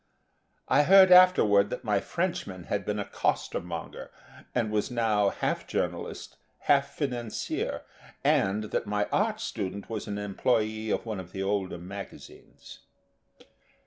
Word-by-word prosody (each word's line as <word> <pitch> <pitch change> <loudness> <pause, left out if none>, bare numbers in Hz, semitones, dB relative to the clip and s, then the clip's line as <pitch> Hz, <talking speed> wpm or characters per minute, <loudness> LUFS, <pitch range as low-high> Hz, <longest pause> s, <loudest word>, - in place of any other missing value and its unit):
I 145 - +4
heard 190 +4 +7
afterward 110 - +6
that - - -5
my 105 -2 +1
Frenchman 170 - -3
had 100 +2 -3
been 105 0 -2
a 100 - -2
costermonger 85 -3 -3 0.5
and 115 -3 0
was 105 -1 0
now 110 -4 +2
half - - -2
journalist, - - -4 0.2
half 140 -1 +2
financier, 120 -6 -3 0.4
and 105 +3 +1
that - - -1
my 105 0 0
art 215 +1 +1
student 100 - -5
was 110 -1 -4
an 100 -1 -3
employee 110 +2 -1
of - - -1
one 110 -4 -4
of 90 -1 -10
the 95 - -3
older 95 -2 -1
magazines. 95 +3 -11
105 Hz, 135 wpm, -28 LUFS, 100-125 Hz, 0.5 s, heard